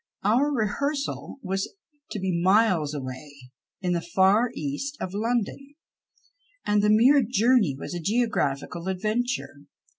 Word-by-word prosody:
Our 245 +9 +3
rehearsal 280 +5 -2
was 195 0 -2 0.4
to - - -5
be 185 -3 -1
miles 185 -6 +3
away, 135 +1 -7 0.5
in 180 -1 0
the 170 - 0
far 190 +7 +3
East 155 - -4
of 185 - -5
London, 240 +6 -2 0.9
and 210 0 +2
the 210 - +2
mere 250 +7 +6
journey 230 - +2
was 140 - -7
a 175 - -3
geographical 175 - -1
adventure. 215 - -2
205 Hz, 125 wpm, -25 LUFS, 175-245 Hz, 0.9 s, mere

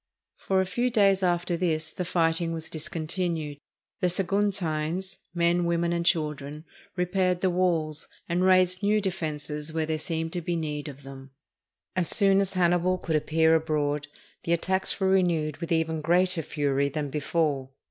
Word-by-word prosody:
For 190 -1 +1
a - - 0
few 240 +7 0
days 200 -4 +3
after 175 -1 +1
this 165 -3 -1
the 180 - -4
fighting 165 -1 +1
was 160 -1 -6
discontinued. 160 -1 -3 0.4
The 180 -3 +2
Saguntines 190 -2 -1
— - - -48
men, 170 +1 +2
women, 170 0 +1
and 170 0 0
children 150 -2 -1
— - - -27
repaired 180 0 +1
the 185 - +2
walls, 165 -4 0 0.2
and 175 +2 0
raised 185 -1 +4
new 210 +1 +3
defenses 155 -5 -3
where 160 -1 0
there 155 0 -2
seemed 160 0 -3
to 175 - -2
be 170 +1 -2
need 150 -2 -3
of 140 -1 -9
them. 135 0 -10 0.7
As 180 -3 +1
soon 195 -2 +4
as 195 -1 -1
Hannibal 180 0 +2
could 165 -3 -2
appear 160 +1 +3
abroad, 150 -2 0 0.4
the 170 - +1
attacks 190 +4 0
were 190 - +2
renewed 170 -6 +2
with 170 +1 -6
even 160 -1 +1
greater 180 +2 +2
fury 140 -2 0
than 145 -1 -3
be 150 - -1
fore. 145 -3 0
170 Hz, 170 wpm, -27 LUFS, 155-185 Hz, 0.7 s, raised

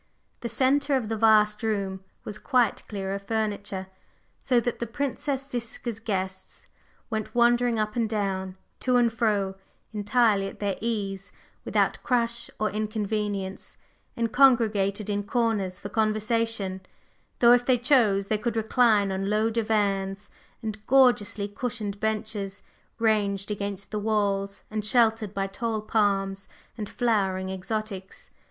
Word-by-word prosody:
The 235 - -4
centre 275 +4 +2
of 240 -5 -1
the 225 - 0
vast 210 -1 +4
room 200 -4 -2 0.2
was 210 0 -6
quite 250 -6 +2
clear 195 -2 -4
of 200 - -4
furniture, 205 -3 -2 0.5
so 250 -2 +2
that 235 0 -2
the 235 - -2
Princess 275 +2 -2
Ziska's 235 -2 -4
guests 190 -4 -4 0.5
went 220 0 -3
wandering 240 0 +3
up 215 0 -1
and 230 -2 0
down, 190 -3 -2 0.2
to 255 -1 +1
and 235 -2 +3
fro, 210 -4 +1 0.4
entirely 210 -1 +2
at - - -10
their 200 -2 -1
ease, 200 -4 -3 0.3
without - - +1
crush 235 -1 0
or 215 0 0
inconvenience, 210 -2 -3 0.4
and 230 -1 0
congregated 215 -6 +3
in 205 -1 0
corners 205 -4 -1
for - - -7
conversation; 215 -3 0 0.6
though 240 -1 +6
if 245 0 +4
they 255 0 +3
chose 230 -6 +3
they 210 +1 0
could 235 0 -2
recline 220 -2 +3
on 195 +1 -2
low 215 +2 +2
divans 200 -3 0 0.3
and 215 -1 -5
gorgeously 240 -6 +4
cushioned 210 -1 -4
benches 215 -2 -2 0.3
ranged 210 -3 +1
against 200 -1 -4
the 210 - -1
walls 200 -2 0
and 215 -1 -2
sheltered 220 -2 +3
by 195 0 0
tall 220 +3 -2
palms 195 -2 0 0.3
and 215 -3 -5
flowering 190 -6 0
exotics. 195 0 -5
215 Hz, 135 wpm, -26 LUFS, 200-230 Hz, 0.6 s, though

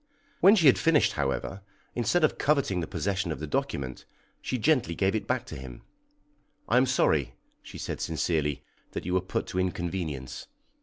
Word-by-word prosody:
When 200 +3 +7
she 175 -7 +3
had 135 - +7
finished, 160 -3 +4
however, 70 +7 -2 0.3
instead 120 +9 +1
of 155 - +2
coveting 140 -11 +2
the 80 - -3
possession 95 -3 -2
of - - -4
the 80 - -4
document, 65 -3 -3 0.4
she 130 - -2
gently 120 - +2
gave 95 +2 +1
it 110 - -2
back - - 0
to - - -8
him. 65 -2 -9 0.8
"I 120 - +3
am 130 +1 +4
sorry," 75 - +2 0.3
she - - -11
said - - -5
sincerely, 80 -3 -1 0.3
"that - - -4
you 90 - -2
were 95 - +3
put 90 - -3
to 90 - -2
inconvenience. 85 -7 -3
95 Hz, 175 wpm, -28 LUFS, 75-125 Hz, 0.8 s, When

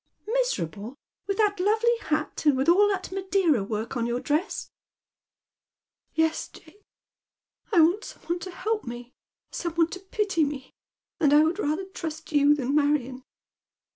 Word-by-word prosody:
" - - -44
Miserable, 240 - -2 0.3
with 395 - -1
that 415 -3 +2
lovely 440 +5 +3 0.2
bat, 305 0 -1
and 285 -3 +5
with 265 - 0
all 390 +5 +6
that 390 -3 -2
Madeira 375 - +1
work 220 +4 -4
on 235 -1 0
your 240 +1 -1
dress? 300 +8 -2 0.4
" - - -67
" - - -67 0.3
Yes, 320 0 +1
Jane. 415 - -18 0.9
I 355 -6 +6
want 350 +7 +3
some - - -11
one 345 +1 -2
to 370 - -7
help 425 +4 -2
me, 240 +1 -8 0.4
some 340 -2 -3
one 335 -1 +3
to 375 - -7
pity 390 -3 0
me, 280 -2 -4 0.5
and 290 -3 +3
I 300 - +7
would 335 +5 0
rather 320 +1 -1
trust 320 -4 -7
you 290 0 +5
than 270 -1 -2
Marion." 285 -3 +1
320 Hz, 170 wpm, -26 LUFS, 275-385 Hz, 0.9 s, I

